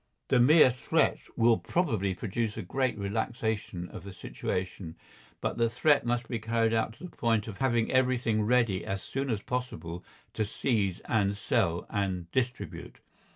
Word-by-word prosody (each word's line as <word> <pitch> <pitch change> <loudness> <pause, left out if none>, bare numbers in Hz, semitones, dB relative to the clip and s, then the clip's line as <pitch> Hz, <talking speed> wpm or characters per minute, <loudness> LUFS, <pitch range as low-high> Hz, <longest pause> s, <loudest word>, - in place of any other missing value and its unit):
The 130 - +4
mere 145 +2 +7
threat 125 - +1 0.2
will 115 0 +4
probably 110 - 0
produce 110 +3 -2
a - - -3
great 130 +6 -1
relaxation 105 -3 -2
of - - -9
the 100 - -8
situation, 90 -2 -4 0.5
but - - -2
the 115 0 +3
threat 140 +3 +3
must 120 0 0
be 115 - -2
carried 115 0 +1
out 110 0 +1
to 120 - -16
the 180 - -9
point 115 -3 +1
of 105 -3 -7
having 120 -4 +1
everything 125 -4 +2
ready 115 -4 +2
as 95 0 -3
soon 135 0 -3
as 110 -4 -1
possible 90 -9 -4 0.3
to 110 - 0
seize 105 -3 -1
and 100 -3 0
sell 85 -3 0
and 95 -5 -2
distribute. 125 -1 -3
115 Hz, 160 wpm, -29 LUFS, 100-125 Hz, 0.5 s, mere